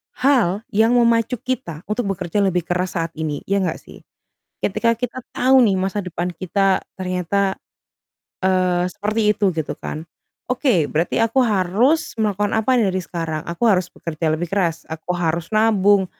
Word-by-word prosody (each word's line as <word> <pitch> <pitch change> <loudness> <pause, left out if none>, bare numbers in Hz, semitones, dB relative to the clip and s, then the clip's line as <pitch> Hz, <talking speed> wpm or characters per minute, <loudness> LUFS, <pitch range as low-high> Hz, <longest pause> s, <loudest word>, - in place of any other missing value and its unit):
hal 230 -7 +2
yang 225 +4 +3
memacu 235 0 +3
kita 180 -11 -4
untuk 215 -1 -1
bekerja 180 +2 -2
lebih 180 -3 +1
keras 180 +2 -2
saat 165 -1 -1
ini. 150 -2 -2
Iya 200 0 +2
nggak - - -3
sih? - - -14 0.6
Ketika 230 +3 +2
kita 245 +2 -4 0.2
tahu 260 +1 +5
nih 200 -3 +2
masa 195 +2 -1
depan 175 0 -3
kita 190 +3 +1 0.2
ternyata, 185 +1 -1 0.9
eee, 185 -1 +2
seperti 215 +4 -2
itu 205 - 0
gitu 160 -2 -2
kan. 155 +1 -5 0.5
Oke, 245 - +2
berarti 160 +3 0
aku 230 +4 +3
harus 220 - +2
melakukan 205 -1 0
apa 220 +4 +2
nih 205 -5 +2
dari 185 - -1
sekarang? 165 -3 -4
Aku 170 +7 -1
harus 185 -3 +2
bekerja 160 -1 -2
lebih 175 - -3
keras, 170 -5 0
aku 160 +2 -4
harus 165 -1 -1
nabung, 205 -3 +4
190 Hz, 160 wpm, -21 LUFS, 175-220 Hz, 0.9 s, tahu